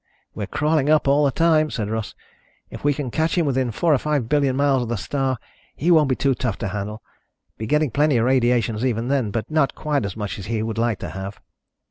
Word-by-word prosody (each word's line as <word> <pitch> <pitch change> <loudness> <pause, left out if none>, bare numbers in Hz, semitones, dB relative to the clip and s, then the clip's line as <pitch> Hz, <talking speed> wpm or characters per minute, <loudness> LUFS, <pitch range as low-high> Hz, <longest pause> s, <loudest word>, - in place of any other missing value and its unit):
"We're - - -5
crawling 150 -1 +1
up 155 -2 +3
all 145 +2 +4
the - - +4
time," 155 +1 +3
said 110 -7 -3
Russ. 110 -1 -4 0.6
"If - - -9
we 145 - +3
can 140 -3 -3
catch 160 +5 0
him 170 - +3
within 130 -3 0
four 155 +8 +1
or 135 - +3
five 145 -5 -1
billion 140 -1 +2
miles 140 -1 +2
of 120 - -4
the 120 - 0
star, 135 +4 -1 0.4
he 170 +4 +1
won't 155 -4 +5
be 130 - +2
too 135 +1 +1
tough 120 -4 -2
to 105 - -3
handle. 105 +2 -5 0.6
Be 110 - -4
getting 150 +1 +2
plenty 145 +1 +2
of 115 - +2
radiations 120 -3 +2
even 120 -1 -1
then, 135 -6 +1
but 110 +7 -4
not 155 -4 +2
quite 150 -4 -1
as 100 0 -5
much 105 -1 -4
as 95 - -7
he 110 -1 -1
would 110 0 -3
like 115 -3 +1
to - - -4
have." 95 +1 -7
130 Hz, 235 wpm, -22 LUFS, 115-150 Hz, 0.6 s, won't